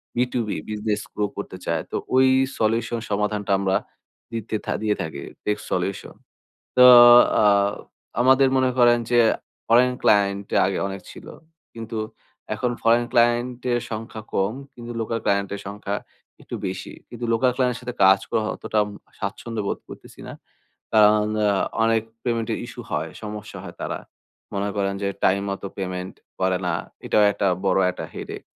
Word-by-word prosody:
B 125 - +3
two 125 - +1
B - - -2
business 105 0 -2
grow 105 - 0
করতে 100 -2 -6
চায়। 85 -1 0
তো - - -4 0.2
ওই 130 0 +6 0.3
সলিউশন 115 +1 0
সমাধানটা 105 0 -1
আমরা 95 -1 +1 0.6
দিতে 110 -1 -3
থাকি - - -2
দিয়ে 105 -1 +1
থাকি, 75 -3 -5 0.2
tech 105 0 0
solution। 95 +2 -2 0.6
তো 125 - +8 0.6
আ - - +4 0.8
আমাদের 130 +1 +5
মনে 130 -1 +3
করেন 120 0 +6
যে 120 - +5 0.5
ফরেন 125 +2 +5
ক্লায়েন্ট 100 -1 +2 0.2
আগে 95 0 -1
অনেক 95 0 -6
ছিলো। - - -11 0.4
কিন্তু 115 -1 -6 0.6
এখন 125 -1 -1
ফরেন 115 +1 +4
ক্লায়েন্টের 120 +1 +2
সংখ্যা 110 0 -6
কম, 100 +2 +1 0.2
কিন্তু 120 0 -9
লোকাল 115 +1 -2
ক্লায়েন্টের 100 0 0
সংখ্যা 100 0 -4 0.5
একটু - - -7
বেশি। - - -6 0.2
কিন্তু 120 0 -6
লোকাল 125 +2 +3
ক্লায়েন্টের 125 -1 0
সাথে 125 0 -6
কাজ 95 +1 +7
করা - - +1
অতটা 110 - -4
অম 105 - -6 0.3
স্বাচ্ছন্দ্য 110 +2 -4
বোধ - - -2
করতেছি - - -12
না। - - -7 0.6
কারণ 105 0 +5
অ্যা 105 -1 +3 0.3
অনেক 115 -1 +3 0.2
পেমেন্টের 115 -2 -1
ইস্যু - - -9
হয়, - - -2
সমস্যা 105 0 -7
হয় - - -9
তারা। - - -3 0.5
মনে 100 +1 -1
করেন 100 -1 0
যে - - +1 0.2
টাইম 100 +1 +3
মতো 100 0 -5
পেমেন্ট 90 -1 -4 0.3
করে 95 -1 +2
না। 85 - 0 0.3
এটাও 105 - +3
একটা 100 - 0 0.2
বড় 95 - +3
একটা - - -7
headace। - - -7
105 Hz, 155 wpm, -23 LUFS, 100-120 Hz, 0.8 s, তো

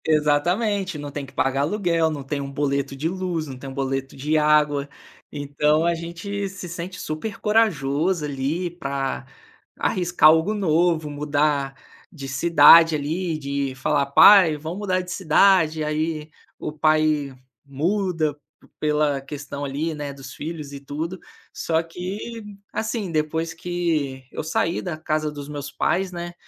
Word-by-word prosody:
Exatamente. 175 +6 +1
Não 145 -1 -6
tem 140 0 -5
que 135 - -16
pagar 135 +1 +1
aluguel, 170 -1 +1
não 145 -3 -5
tem 140 +1 -3
um 140 0 -6
boleto 140 -1 -1
de 145 +4 -2
luz, 180 -3 -2
não 130 -2 -7
tem 135 +1 -8
um - - -8
boleto 135 0 -3
de 150 +3 0
água. 150 -2 +3 0.4
Então, 150 +2 +1
a 170 - +3
gente 170 +4 -5
se 185 -1 -8
sente 175 +2 -6
super 155 +8 -5
corajoso 175 -6 +1
ali 145 +5 -2
pra 140 -5 -3 0.5
arriscar 175 -3 +4
algo 160 +6 +3
novo, 170 -5 +1
mudar 145 -1 0 0.4
de 140 -7 -8
cidade 165 +3 +7
ali, 160 +3 -2
de 140 -2 -3
falar: 140 +1 0
"Pai, 165 +2 +7
vamos 160 +6 -6
mudar 185 -3 0
de 180 0 -8
cidade?" 165 -3 +3
Aí 155 0 -2 0.3
o - - -4
pai 155 -2 +2 0.3
muda 160 +1 -1 0.4
pela 150 -2 +1
questão 145 +1 -6
ali, 150 +4 -2
né, 145 -1 -5
dos 135 -2 -10
filhos 155 -2 -6
e 140 - -7
tudo. 155 +6 -5 0.3
Só 160 -1 0
que 190 +7 -6 0.3
assim, 220 -4 -3
depois 160 +1 -1
que 165 -6 -2
eu - - -4
saí 165 +2 0
da 175 -4 -3
casa 155 -1 -1
dos 145 -1 -8
meus 145 -1 -6
pais, 190 0 0
né, 175 0 -6
155 Hz, 150 wpm, -23 LUFS, 145-175 Hz, 0.5 s, cidade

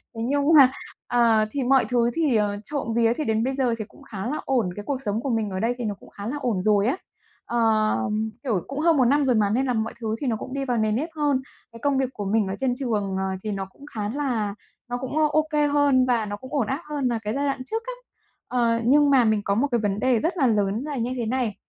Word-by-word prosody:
Thế 225 - -5
nhưng 285 0 +1
mà, 265 -2 +8 0.4
ờ, 230 -3 +3
thì 275 +1 -2
mọi 265 +1 +4
thứ 240 -1 +2
thì, 310 -7 +1
ờ, 205 -1 +1
trộm 280 -3 -3
vía 230 -1 +3
thì 305 - -2
đến 220 -1 +1
bây 265 +2 0
giờ 255 -4 +1
thì 215 - -3
cũng - - -18
khá 195 -2 -6
là 295 +4 -2
ổn, 245 -8 +1
cái 205 - -6
cuộc 270 -2 -2
sống 215 -2 -1
của 275 - -3
mình 225 -3 0
ở 185 -1 -4
đây 230 +4 +1
thì 245 - -4
nó 205 -2 -2
cũng - - -17
khá 200 +1 -8
là 275 +5 -3
ổn 225 -8 0
rồi 205 +1 +3
á. 270 - +1 0.5
Ờ, 240 - -1 0.8
kiểu, 220 -10 0
cũng 275 +1 -5
hơn 325 0 +3
một 260 - +4
năm 285 +3 +3
rồi 255 -2 +3
mà 210 -2 +3
nên 250 +6 +1
là 255 - 0
mọi 220 -1 -2
thứ 220 0 -1
thì 280 - -1
nó 235 - +1
cũng 255 +4 -7
đi 275 0 -2
vào 245 -2 0
nề 215 -1 +1
nếp 275 +10 -1
hơn. 290 -3 +1 0.3
Cái 230 - -12
công 280 +2 +1
việc 265 -1 +1
của 205 - -5
mình 210 0 +1
ở 190 - -3
trên 260 0 0
trường, 215 -7 -1
ờ, 190 - -1 0.2
thì 215 - -2
nó 195 -1 -3
cũng 235 +9 -16
khá 210 -1 -2
là 235 -6 -2 0.3
nó 245 - -2
cũng 260 +4 -4
OK 305 -1 +2
hơn 285 -3 +4
và 240 -3 +1
nó 205 0 -4
cũng 260 +5 -11
ổn 270 -7 +1
áp 270 +7 -2
hơn 290 -3 -1
là 235 -2 0
cái 210 +1 -2
giai 280 +1 0
đoạn 270 -2 -2
trước 450 +11 -2
á. - - -3 0.5
Ờ, 235 -2 +1
nhưng 290 +3 +5
mà 265 -4 +5
mình 215 -1 +2
có 200 - +1
một 255 +7 +2
cái 240 - +2
vấn 205 -2 -1
đề 250 0 +2
rất 335 +7 -1
là 270 -6 +3
lớn 210 +1 +1
là 300 -1 -4
như 240 +2 -1
thế 235 - -2
này, 235 -3 -1
245 Hz, 280 wpm, -24 LUFS, 215-275 Hz, 0.8 s, mà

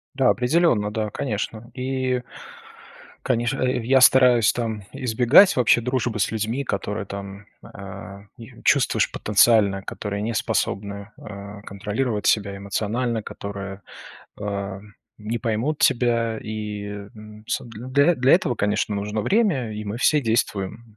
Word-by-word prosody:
Да, 135 - +3
определённо, 125 -6 +2
да, 110 -1 -2
конечно. 110 0 -4
И 130 -1 -2 1.0
конечно, 120 +1 0
э, 125 -1 +1
я 130 +1 +4
стараюсь 125 -4 +6
там 110 -4 -3
избегать 125 - +5
вообще 120 -1 +4
дружбы 120 -3 -1
с 105 - +1
людьми, 110 +5 -2
которые 105 +1 -3
там, 100 +1 -8 0.2
э, 100 0 -10
и 115 -2 -13
чувствуешь - - +3
потенциально, 105 -2 +3
которые 100 +1 -5
не 115 +2 -2
способны, 100 0 -2
э, 100 0 -9
контролировать 105 +2 -2
себя 100 -2 +1
эмоционально, 110 +3 -2
которые, 100 -1 -7 0.6
э, 100 -1 -4 0.4
не 110 +2 -3
поймут 120 +6 -1
тебя. 115 -2 +2
И, 105 -1 -5 0.3
м, 105 0 -13
с - - -2
для 130 +8 +1
для 130 +1 +3
этого, 145 -8 +3
конечно, 105 0 0
нужно 105 +2 -2
время, 180 - +1
и 105 0 -5
мы 105 +3 -4
все 150 +3 +3
действуем 110 -1 -2
110 Hz, 130 wpm, -23 LUFS, 100-125 Hz, 1.0 s, стараюсь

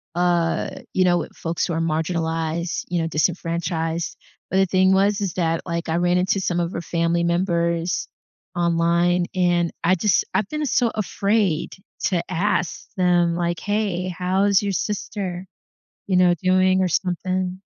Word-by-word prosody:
uh, 175 -1 +1 0.2
you 185 - +3
know, 175 -1 +4
with - - -5
folks 165 0 -2
who 170 - -3
are 165 - -1
marginalized, 165 +1 -1
you 175 -1 -1
know, 165 - -1
disenfranchised. 165 0 -1 0.3
But 190 - 0
the 195 - +5
thing 190 +1 +3
was 200 +2 +3
is 195 -5 -2
that, 165 -2 0
like, 170 -1 -3
I 165 - +1
ran 175 0 +2
into 190 +2 +1
some 175 -2 0
of 170 +1 -2
her 170 - -3
family 170 +1 0
members 170 -1 0 0.5
online, 170 +1 +2
and 175 -2 +2
I 185 +2 +4
just 190 +1 +2
I've 205 - +1
been 300 0 -3
so 245 -3 +2
afraid 200 -4 0 0.3
to 180 -4 +1
ask 180 0 -1
them, 175 -2 +2
like, 175 -1 -1
"Hey, 205 -4 -1
how's 190 +2 +2
your 200 -1 -1
sister," 190 0 -3 0.6
you 190 - +1
know, 180 -1 +5
"doing?" 185 0 +3
or 185 - +2
something. 185 +1 -1
175 Hz, 160 wpm, -22 LUFS, 170-185 Hz, 0.6 s, the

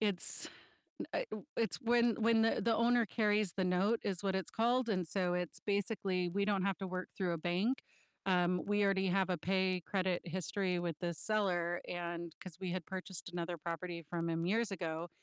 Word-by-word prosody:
it's, 205 -4 +1 0.5
u - - -3
a - - 0
u 215 - -6
it's 225 - +1
when 235 -1 +4
when 225 0 +5
the 225 - +2
the 230 -1 +3
owner 235 +1 +4
carries 210 -3 +2
the 190 - 0
note 190 +5 +2
is 195 -1 -2
what 190 -1 +1
it's 190 - -2
called, 240 +1 +2
and 185 -5 0
so 180 0 0
it's 180 -1 -2
basically 195 -3 0
we 200 +3 0
don't 200 -3 +1
have 195 -2 +1
to 190 - -3
work 185 0 -4
through 180 -3 0
a 170 - -1
bank, 185 +10 +1 0.5
um, 180 -1 +3
we 205 0 +2
already 195 -1 +3
have 190 0 +2
a 180 - +1
pay 185 +1 +1
credit 185 -3 0
history 180 +1 -1
with 170 -3 -2
the 175 -1 -1
seller 175 -4 0
and 170 -1 -4
'cause 180 -3 -9
we 185 -2 -3
had 185 -3 -3
purchased 190 -2 -5
another 175 0 -3
property 170 +1 -4
from 170 -1 -1
him 165 +1 0
years 220 +2 +1
ago, 165 -2 -3
185 Hz, 200 wpm, -35 LUFS, 175-205 Hz, 0.5 s, when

